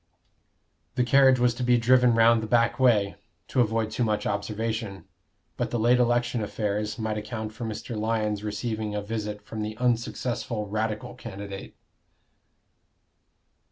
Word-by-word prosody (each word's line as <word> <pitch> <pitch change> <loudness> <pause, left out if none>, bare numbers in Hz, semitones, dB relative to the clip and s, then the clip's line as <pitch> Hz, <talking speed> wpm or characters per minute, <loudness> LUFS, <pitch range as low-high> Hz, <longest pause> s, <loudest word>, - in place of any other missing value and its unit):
The 125 - +2
carriage 130 +1 +5
was 120 -1 +3
to 120 - -7
be 125 0 +4
driven 125 0 +4
round 115 0 +5
the 110 - -4
back 115 +1 +2
way, 105 -6 +3 0.3
to 130 - +2
avoid 110 -1 0
too 125 - 0
much 110 -2 0
observation. 105 0 -3 0.5
But - - -1
the 120 - -1
late 120 +2 +4
election 120 -1 +1
affairs 105 0 -2
might 110 -2 -2
account 110 0 -5
for 115 +1 -6
Mr. 110 +2 -5
Lyon's 105 -1 -1
receiving 110 0 -3
a 105 - -2
visit 105 -1 -4
from 110 0 -6
the 110 0 -4
unsuccessful 120 -2 -1
Radical 110 +2 -2
candidate. 100 -5 -8
110 Hz, 145 wpm, -26 LUFS, 105-120 Hz, 0.5 s, carriage